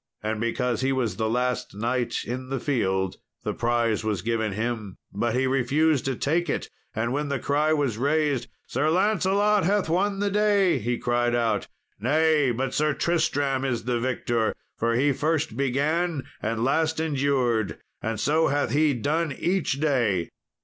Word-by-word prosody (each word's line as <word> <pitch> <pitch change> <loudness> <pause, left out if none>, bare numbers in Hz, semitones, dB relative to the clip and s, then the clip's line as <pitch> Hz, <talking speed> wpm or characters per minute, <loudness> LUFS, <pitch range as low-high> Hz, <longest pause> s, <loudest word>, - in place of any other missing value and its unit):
And 110 0 -2
because 120 0 0
he 135 +1 +1
was 130 -5 0
the 110 -1 0
last 125 -2 -1
knight 120 +3 -1
in 130 +2 -5
the 135 -1 -2
field 95 -9 0 0.3
the - - -2
prize 115 -2 0
was 105 -5 -2
given 110 -2 -1
him. 110 -2 -3 0.2
But 115 +3 0
he 130 +1 +2
refused 135 +3 +2
to 135 -1 0
take 165 +8 0
it, - - -2 0.2
and 115 +3 -1
when 145 +1 -1
the 140 - 0
cry 150 +4 +1
was 140 -8 0
raised, 145 -2 +1 0.2
"Sir 150 - 0
Lancelot 200 +3 +2
hath 195 0 +1
won 195 +4 +1
the 200 0 0
day," 200 -6 +3
he 120 +2 -1
cried 120 0 +1
out, 115 -2 0 0.3
"Nay, 150 +4 +3
but 130 +2 -2
Sir 150 -1 +1
Tristram 145 -5 0
is 125 -4 -1
the 120 0 0
victor, 120 -2 0 0.2
for 115 0 0
he 140 +4 +3
first 155 -3 -1
began 145 +4 0 0.2
and 115 +1 -1
last 160 +4 +1
endured, 135 -8 0 0.2
and 110 -2 -2
so 155 +6 +2
hath 145 +1 0
he 150 -1 +3
done 155 +6 0
each 180 +5 0
day." 120 - +1
135 Hz, 165 wpm, -25 LUFS, 115-155 Hz, 0.3 s, day